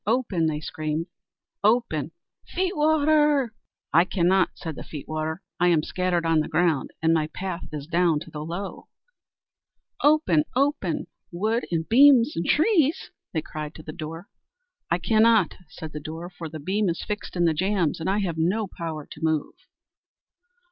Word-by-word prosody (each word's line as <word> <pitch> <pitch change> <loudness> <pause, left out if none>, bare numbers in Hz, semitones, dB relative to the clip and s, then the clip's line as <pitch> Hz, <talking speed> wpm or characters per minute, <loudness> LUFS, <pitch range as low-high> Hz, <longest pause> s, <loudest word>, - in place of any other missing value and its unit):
open!" 215 -8 +1
they 150 -1 -1
screamed; 155 +1 -3 0.6
"open, 210 - +2 0.5
feet 370 +1 0
water!" 300 -4 +3 0.4
"I 170 +3 +7
cannot," 185 0 +2
said 160 -3 -6
the - - -7
feet 150 -3 -8
water; 155 +3 -3 0.2
"I 175 - +4
am 165 -3 +3
scattered 180 -1 -1
on 165 -1 +3
the 155 - -1
ground, 165 -3 +1
and 160 0 +4
my 155 -2 +1
path 185 +2 -5
is 150 -2 -5
down 170 -1 +2
to - - -10
the 150 0 -6
Lough." 175 +5 -6 1.2
"Open, 305 0 +4
open, 270 - 0 0.3
wood 220 +7 -1
and 165 -2 -1
trees 265 +1 +6
and 170 - -2 0.2
beam!" 325 -9 +4 0.4
they 160 - -2
cried 150 0 -6
to 155 - -11
the 155 - -7
door. 165 +5 -7 0.6
"I - - +2
cannot," 220 -5 +4 0.2
said 160 0 -8
the 150 - -4
door, 160 +4 -7
"for 170 -3 -7
the 155 0 -7
beam 190 +6 0
is 170 - -3
fixed 210 -2 -5
in 175 -1 +2
the 165 - +3
jambs 180 -2 0
and 165 +3 -2
I 200 +2 +1
have 170 -5 -2
no 195 +7 +1
power 165 -5 -6
to 150 - -12
move." 160 -2 0
175 Hz, 170 wpm, -25 LUFS, 160-220 Hz, 1.2 s, I